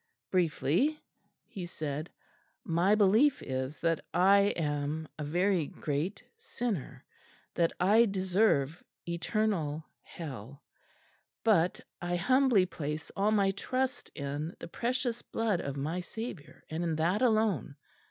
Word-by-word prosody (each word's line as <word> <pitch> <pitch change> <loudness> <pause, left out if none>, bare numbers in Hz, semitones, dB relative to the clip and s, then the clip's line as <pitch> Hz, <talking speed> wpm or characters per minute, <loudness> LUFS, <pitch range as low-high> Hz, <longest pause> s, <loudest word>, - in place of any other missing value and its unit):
"Briefly," 185 - +2 0.5
he 180 -3 -7
said, 155 -1 -4 0.5
"my 185 0 +3
belief 220 +8 +4
is 130 +2 -3
that 165 -1 +1
I 200 +2 +6
am 150 0 -1
a - - -2
very 175 +1 +1
great 155 +7 -3 0.2
sinner, 240 - -4 0.5
that 170 -1 +2
I 210 +6 +6
deserve 185 -6 +1 0.2
eternal 170 -4 -1 0.2
hell; 140 -4 -9 0.8
but 180 -6 +3 0.2
I 175 0 -1
humbly 250 +1 +4
place 150 -3 -5
all 200 +2 +2
my 200 -2 +3
trust 255 +6 -2
in 145 +3 -4
the - - -8
Precious 240 +4 -2
Blood 220 -5 -1
of 140 0 -4
my 155 +6 -2
Saviour, 195 - -7
and 160 +2 -3
in 165 -2 0
that 170 +7 +1
alone. 220 - +2
175 Hz, 120 wpm, -31 LUFS, 155-215 Hz, 0.8 s, I